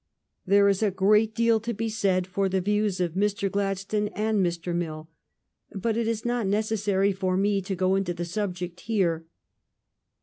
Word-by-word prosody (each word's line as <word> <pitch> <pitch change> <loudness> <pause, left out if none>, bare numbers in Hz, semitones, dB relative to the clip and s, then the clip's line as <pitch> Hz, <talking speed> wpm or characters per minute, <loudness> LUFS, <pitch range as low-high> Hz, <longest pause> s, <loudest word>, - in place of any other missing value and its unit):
There 200 +1 +5
is 195 0 +2
a 215 - +3
great 210 +3 +3
deal 230 -1 +3
to 230 +1 -4
be 225 +2 -2
said 195 -4 +1
for 195 +1 -1
the 190 0 +1
views 205 0 0
of 175 -3 -1
Mr. 200 0 0
Gladstone 200 +1 -1
and 215 -2 +1
Mr. 175 0 -2
Mill; 160 -2 -4 0.6
but 215 +3 -1
it 230 -1 0
is 225 0 -2
not 240 -3 0
necessary 205 -1 +1
for 185 -1 -1
me 200 0 +1
to 190 +1 -4
go 185 +1 +1
into 190 -2 0
the 175 0 -3
subject 180 -2 -4
here. 175 -6 -1
195 Hz, 175 wpm, -26 LUFS, 185-215 Hz, 0.6 s, There